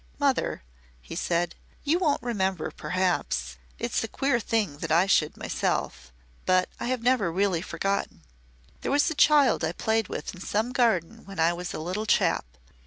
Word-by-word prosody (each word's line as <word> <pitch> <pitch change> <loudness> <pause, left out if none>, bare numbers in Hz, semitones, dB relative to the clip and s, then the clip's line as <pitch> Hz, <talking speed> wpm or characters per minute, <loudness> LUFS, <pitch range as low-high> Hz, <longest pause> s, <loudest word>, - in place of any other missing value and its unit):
"Mother," 275 - 0 0.4
he - - -9
said, 175 0 0 0.3
"you 315 +4 +2
won't 310 -6 +1
remember 190 -8 -1
perhaps 175 - -1 0.2
it's - - -1
a - - -2
queer 270 -3 +1
thing 205 -9 -1
that 165 0 -4
I 170 +3 +5
should 160 -6 +2
myself 60 - -2 0.4
but 185 0 +4
I - - -3
have 250 -2 -1
never 245 -8 +2
really 185 -1 +1
forgotten. 195 +2 -2 0.6
There - - -2
was 290 +3 +3
a - - 0
child 290 - +5
I 160 +1 0
played 220 +2 0
with 150 - -5
in 180 - -11
some 220 +5 -1
garden 225 - +1
when 195 -2 -9
I 165 +1 +4
was 175 0 -5
a - - -4
little 185 +7 -3
chap. - - +2
195 Hz, 175 wpm, -27 LUFS, 170-245 Hz, 0.6 s, I